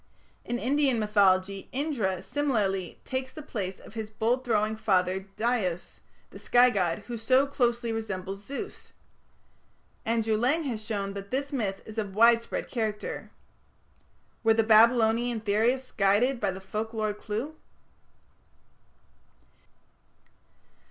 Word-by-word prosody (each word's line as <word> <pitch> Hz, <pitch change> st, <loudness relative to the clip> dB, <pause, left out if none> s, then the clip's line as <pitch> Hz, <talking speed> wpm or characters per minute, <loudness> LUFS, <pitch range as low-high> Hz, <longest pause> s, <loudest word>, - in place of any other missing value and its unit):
In 240 Hz, -, -2 dB
Indian 270 Hz, 0 st, +1 dB
mythology 195 Hz, -2 st, +2 dB
Indra 235 Hz, -, -1 dB
similarly 205 Hz, -, -1 dB
takes 260 Hz, 0 st, -3 dB
the 310 Hz, -, -9 dB
place 195 Hz, -9 st, -4 dB
of -, -, -14 dB
his 220 Hz, -1 st, -5 dB
bolt 230 Hz, +4 st, 0 dB
throwing 215 Hz, -3 st, +1 dB
father 190 Hz, -3 st, +1 dB
Dyaus, 215 Hz, -7 st, -1 dB, 0.3 s
the -, -, -11 dB
sky 245 Hz, +1 st, +5 dB
god, 185 Hz, -1 st, 0 dB
who 235 Hz, +1 st, -5 dB
so 255 Hz, +5 st, +4 dB
closely 240 Hz, -4 st, 0 dB
resembles 195 Hz, -3 st, -4 dB
Zeus. 280 Hz, -, -7 dB, 1.1 s
Andrew 225 Hz, -1 st, +1 dB
Lang 270 Hz, +9 st, +2 dB
has 230 Hz, -7 st, -4 dB
shown 200 Hz, -2 st, -3 dB
that 200 Hz, 0 st, -7 dB
this 280 Hz, +2 st, -2 dB
myth 205 Hz, -7 st, -2 dB
is 220 Hz, +1 st, -6 dB
of 200 Hz, -3 st, -4 dB
widespread 230 Hz, +1 st, +3 dB
character. 220 Hz, -3 st, -3 dB, 1.1 s
Were 225 Hz, -1 st, +4 dB
the 225 Hz, -, +3 dB
Babylonian 230 Hz, +1 st, +4 dB
theorists 225 Hz, +5 st, +1 dB
guided 215 Hz, +6 st, +2 dB
by 205 Hz, -, 0 dB
the 190 Hz, 0 st, -5 dB
folk 215 Hz, +4 st, -5 dB
lore 215 Hz, -1 st, 0 dB
clue? 220 Hz, +8 st, -5 dB
220 Hz, 125 wpm, -28 LUFS, 200-245 Hz, 1.1 s, sky